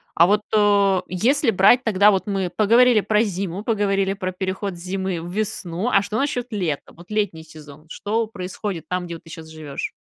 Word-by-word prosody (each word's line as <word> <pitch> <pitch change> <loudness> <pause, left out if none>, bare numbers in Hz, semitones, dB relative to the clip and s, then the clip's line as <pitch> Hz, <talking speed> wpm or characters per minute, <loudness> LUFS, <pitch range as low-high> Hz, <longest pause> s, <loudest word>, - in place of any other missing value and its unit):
А 170 - +6
вот, 205 +2 +3
э, 200 -3 +3
если 240 - +2
брать 210 +6 +5
тогда, 210 -2 +4
вот 195 0 -1
мы 195 -3 -1
поговорили 230 +3 +5
про 210 +2 +2
зиму, 195 -2 -4
поговорили 200 -3 0
про 185 -1 -4
переход 190 +1 -4
с - - -12
зимы 190 -2 -3
в 175 +1 -7
весну, 200 -1 -3
а 200 - +4
что 215 +2 -3
насчёт 270 -4 -1
лета? 175 -9 -3
Вот 175 +3 -16
летний 205 -7 -2
сезон, 150 -1 -14
что 220 +6 -2
происходит 190 -2 -6
там, 180 0 -2
где 170 -1 -6
вот - - -13
ты 165 - -15
сейчас 160 0 -9
живёшь? 155 -3 -6
195 Hz, 195 wpm, -22 LUFS, 175-210 Hz, -, А